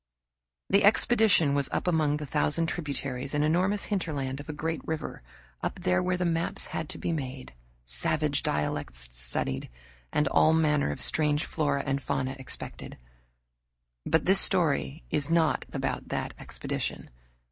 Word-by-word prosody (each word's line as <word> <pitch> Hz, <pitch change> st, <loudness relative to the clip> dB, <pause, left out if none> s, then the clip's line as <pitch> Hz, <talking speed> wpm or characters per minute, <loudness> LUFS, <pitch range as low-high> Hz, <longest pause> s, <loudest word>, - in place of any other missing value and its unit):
The 200 Hz, +1 st, +5 dB
expedition 205 Hz, -7 st, +5 dB
was 140 Hz, -1 st, +1 dB
up -, -, -1 dB
among 155 Hz, -4 st, +2 dB
the 150 Hz, -, -5 dB
thousand 150 Hz, +3 st, +1 dB
tributaries 140 Hz, -5 st, -3 dB
and 145 Hz, -, +2 dB
enormous 185 Hz, +6 st, +2 dB
hinterland 145 Hz, -9 st, -2 dB
of 145 Hz, -, -9 dB
a -, -, 0 dB
great 160 Hz, +2 st, -3 dB
river, 160 Hz, -1 st, -4 dB, 0.4 s
up 185 Hz, -, -4 dB
where 180 Hz, 0 st, +2 dB
the 180 Hz, -, 0 dB
maps 165 Hz, 0 st, 0 dB
had 160 Hz, -, -3 dB
to -, -, -4 dB
be -, -, -2 dB
made, 130 Hz, -, -5 dB, 0.3 s
savage -, -, +1 dB
dialects -, -, -2 dB
studied, 60 Hz, +2 st, -3 dB, 0.4 s
and 150 Hz, -1 st, +2 dB
all 155 Hz, -, +5 dB
manner 150 Hz, -, +2 dB
of 75 Hz, -, -4 dB
strange 150 Hz, -1 st, +2 dB
flora 145 Hz, -3 st, 0 dB
and 140 Hz, 0 st, 0 dB
fauna 135 Hz, -1 st, -2 dB
expected. 130 Hz, -, -5 dB, 1.1 s
But 160 Hz, 0 st, +1 dB
this 190 Hz, +1 st, +5 dB
story 160 Hz, -5 st, +2 dB
is 150 Hz, -1 st, +1 dB
not 165 Hz, -3 st, +2 dB
about -, -, -3 dB
that -, -, -3 dB
expedition. -, -, -4 dB
150 Hz, 145 wpm, -28 LUFS, 140-170 Hz, 1.1 s, The